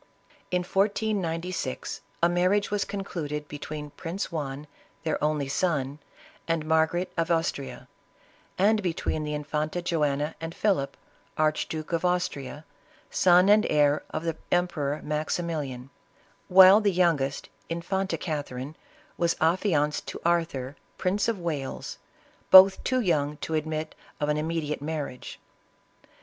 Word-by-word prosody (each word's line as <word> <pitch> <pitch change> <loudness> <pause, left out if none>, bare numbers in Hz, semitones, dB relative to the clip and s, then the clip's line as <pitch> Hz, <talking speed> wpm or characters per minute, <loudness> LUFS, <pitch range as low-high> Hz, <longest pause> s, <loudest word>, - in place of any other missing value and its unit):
In 180 0 0
1496, 185 - -1 0.2
a - - +7
marriage 185 +4 +2
was 205 -1 0
concluded 150 -7 -4
between 150 0 -7
Prince 175 +7 -5
Juan, 145 -3 -4 0.4
their 160 -2 -1
only 150 -2 +1
son, 140 -2 -1 0.5
and 165 -2 0
Margarite 160 +3 +1
of 165 0 0
Austria, 165 -4 -2 0.7
and 210 +3 +3
between 165 -3 -2
the 150 0 -3
infanta 150 +3 -2
Joanna 150 -3 0
and 165 0 -5
Philip, 190 -10 0 0.4
Archduke 155 +1 -1
of 165 0 0
Austria, 160 -5 -2 0.5
son 180 +1 +5
and 210 +1 +6
heir 150 0 +3
of 155 - -4
the 165 -2 -1 0.2
Emperor 155 -5 0
Maximilian; 150 -4 -3 0.6
while 190 +3 +8
the 205 -1 +3
young 170 -5 +3
est, 135 +1 -3 0.2
infanta 190 +3 -2
Catherine, 145 -3 -4 0.4
was 170 -1 +2
affianced 160 -3 +1
to - - -6
Arthur, 160 -6 0 0.2
Prince 195 +2 0
of 230 -3 0
"Wales, 155 -7 -4 0.5
both 190 +1 +9
too 255 -1 +1
young 150 -7 0
to 160 - -5
admit 155 0 -2 0.3
of 150 - 0
an 150 - +1
immediate 155 -2 -2
marriage. 145 -4 -5
160 Hz, 125 wpm, -27 LUFS, 150-180 Hz, 0.7 s, both